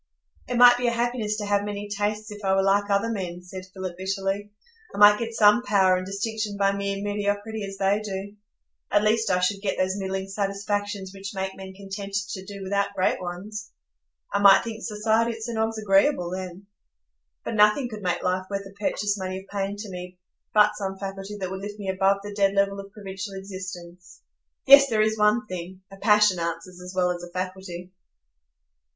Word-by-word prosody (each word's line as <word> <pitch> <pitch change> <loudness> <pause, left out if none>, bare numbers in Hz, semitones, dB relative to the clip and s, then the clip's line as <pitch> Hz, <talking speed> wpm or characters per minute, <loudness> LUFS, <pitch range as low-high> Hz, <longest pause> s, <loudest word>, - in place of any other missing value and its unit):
"It 245 - -2
might 245 0 +8
be 245 0 0
a - - +3
happiness 235 -3 -1
to 210 - -3
have 205 0 +1
many 205 0 -4
tastes 210 +1 -2
if 205 0 -9
I 190 0 +2
were 195 - +3
like 200 +1 +2
other 200 +3 +1
men," 180 -4 -4
said 185 +1 -9
Philip, 185 -2 -6
bitterly. 195 +1 -2 0.5
"I - - -6
might 205 0 +8
get 230 -1 -4
some 210 +3 +6
power 195 -6 +3
and 185 0 -3
distinction 210 +1 -3
by 195 0 +3
mere 200 0 -3
mediocrity, 205 +1 -2
as 195 0 -8
they 195 +2 +2
do; 200 0 -5 0.5
at 205 0 +3
least 220 +1 +2
I 180 -1 +3
should 195 +2 0
get 200 -2 -1
those 185 +1 +1
middling 190 0 -3
satisfactions 200 0 -3
which 195 +1 -7
make 190 0 -3
men 190 0 -9
contented 200 +1 -5
to 190 -2 -5
do 200 0 -8
without 200 +1 -1
great 185 - +1
ones. 200 +4 -6 0.6
I 200 - +2
might 200 -1 +7
think 225 -1 -6
society 220 +2 +1
at 225 0 -8
St 235 0 -4
Ogg's 220 0 0
agreeable 195 -2 +2
then. 185 +1 -6 0.8
But - - -3
nothing 210 +5 +4
could 215 -3 -8
make 180 -2 -1
life 185 +1 0
worth 200 -1 -3
the 195 0 -12
purchase 205 0 -1
money 185 0 -3
of 190 +1 -10
pain 200 0 -1
to 210 0 -7
me, 180 0 -8 0.3
but 210 0 +5
some 195 -2 -4
faculty 195 +1 -6
that 185 -1 -4
would 190 0 -5
lift 205 +1 -6
me 200 -2 -5
above 195 +1 +2
the 205 0 -7
dead 200 -1 +2
level 200 0 +1
of 195 0 -9
provincial 195 -1 -7
existence. 185 -2 -9 0.5
Yes, 275 0 +9
there 215 -2 +3
is 220 0 +1
one 210 +2 +3
thing,—a 185 +1 -8
passion 210 -3 +4
answers 175 +2 -4
as 180 0 -8
well 180 -1 +2
as 175 -1 -4
a 175 - -9
faculty." 185 0 -5
200 Hz, 200 wpm, -25 LUFS, 190-210 Hz, 0.8 s, Yes